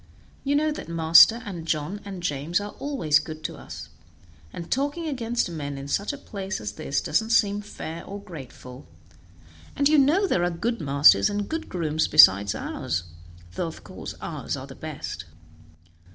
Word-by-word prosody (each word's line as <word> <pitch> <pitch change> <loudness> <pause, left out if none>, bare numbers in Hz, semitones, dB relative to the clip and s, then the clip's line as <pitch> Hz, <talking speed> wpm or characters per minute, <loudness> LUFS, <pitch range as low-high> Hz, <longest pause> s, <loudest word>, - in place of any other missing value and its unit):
You 285 +1 +1
know 305 +1 +2
that 300 - -7
master, 165 +8 +6
and 175 -5 -7
John 165 +7 -2
and 195 -3 -8
James 150 +2 -1
are 205 0 -6
always 170 - +2
good 155 0 -8
to - - -4
us, - - -10 0.6
and 170 - -8
talking 290 +5 -1
against 240 -4 -1
men 145 -5 -5
in 135 0 -7
such 200 +8 -1
a 285 - -7
place 195 -7 -5
as 105 -1 -5
this 135 +6 -2
doesn't 220 +8 0
seem 205 -3 +3
fair 170 -5 -7
or 200 +1 -7
grateful, 135 -8 -11 0.9
and 280 - +3
you 305 0 +5
know 310 +9 +4
there 180 - +1
are 175 - +2
good 220 +6 -2
masters 140 +6 +5
and 205 0 -2
good 320 0 -4
grooms 160 -3 0
beside 100 -9 +7
ours, 85 +1 -3 0.5
though 170 - -2
of 165 - -9
course - - -8
ours - - -4
are - - -7
the - - -11
best." - - -7
180 Hz, 175 wpm, -25 LUFS, 155-230 Hz, 0.9 s, beside